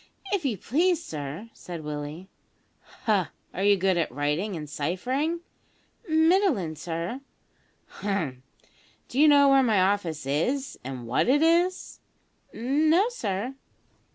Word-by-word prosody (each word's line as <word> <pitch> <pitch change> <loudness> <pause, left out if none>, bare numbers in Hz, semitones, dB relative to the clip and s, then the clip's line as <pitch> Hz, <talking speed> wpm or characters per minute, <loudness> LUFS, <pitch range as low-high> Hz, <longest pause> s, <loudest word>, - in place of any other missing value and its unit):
"If 390 -4 0
you 235 -7 0
please, 330 - +1
sir," 155 +9 -6
said 170 -3 -8
Willie. 150 +4 -6 0.8
"Ha! 205 -6 +2 0.2
are 185 - -4
you 205 0 +5
good 190 -1 +2
at 165 -6 0
writing 150 - -1
and 150 -2 -6
ciphering?" 250 - -2 0.7
"Middlin', 320 - +3
sir." 170 - -4 0.8
"Hum! 170 -11 -2 0.7
D'you 285 +5 +4
know 285 -1 +6
where 275 0 +6
my 220 -6 +3
office 185 -6 0
is, 250 - -1
and 125 -2 -6
what 120 - +1
it 290 +4 +4
is?" 350 +3 +1 0.5
"No, 310 - +2
sir." 225 - -3
205 Hz, 125 wpm, -26 LUFS, -, 0.8 s, know